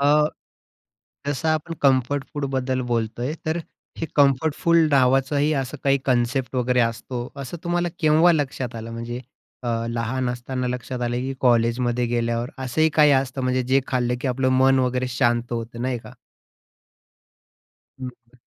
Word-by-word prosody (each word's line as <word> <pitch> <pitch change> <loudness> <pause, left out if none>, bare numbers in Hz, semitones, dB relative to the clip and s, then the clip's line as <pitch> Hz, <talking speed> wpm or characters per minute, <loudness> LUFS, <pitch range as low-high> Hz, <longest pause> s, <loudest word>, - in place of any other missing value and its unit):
अ, 150 +2 +4 1.0
जसं 145 +3 -1
आपण 155 +1 -1
comfort 135 0 +2
food 145 -1 -2
बद्दल 130 0 0
बोलतोय, 120 +5 -1
तर 160 +2 0 0.4
हे 165 - -2
कम्फर्टफुल 150 +4 +3
नावाचंही 135 +3 +3
असं 130 +4 -7
काही 140 0 +4
कन्सेप्ट 130 +1 0
वगैरे 125 0 +2
असतो 115 +2 -2 0.2
असं 135 +6 -6
तुम्हाला 175 0 0
केव्हा 160 +2 +5
लक्षात 130 -5 -2
आलं? 115 0 -6
म्हणजे, 120 +1 -5 0.4
अ, 120 - -3 0.2
लहान 120 +2 -1
असताना 125 +1 -3
लक्षात 125 0 -4
आलं, 120 0 -1
की 130 +2 -2
कॉलेज 120 -1 +3
मध्ये 120 0 0
गेल्यावर? 120 +1 -1
असंही 155 +5 +2
काही 150 -2 +6
असतं 135 0 0
म्हणजे, 130 0 +1
जे 130 +2 +3
खाल्लं 125 -1 0
की 135 - -1
आपलं 130 +1 +1
मन 135 0 +5
वगैरे 125 0 0
शांत 120 -1 0
होतं. 115 0 -4
नाही 125 -2 -1
का? - - -13 1.9
हं. 125 -1 -10
130 Hz, 150 wpm, -23 LUFS, 120-140 Hz, 1.9 s, काही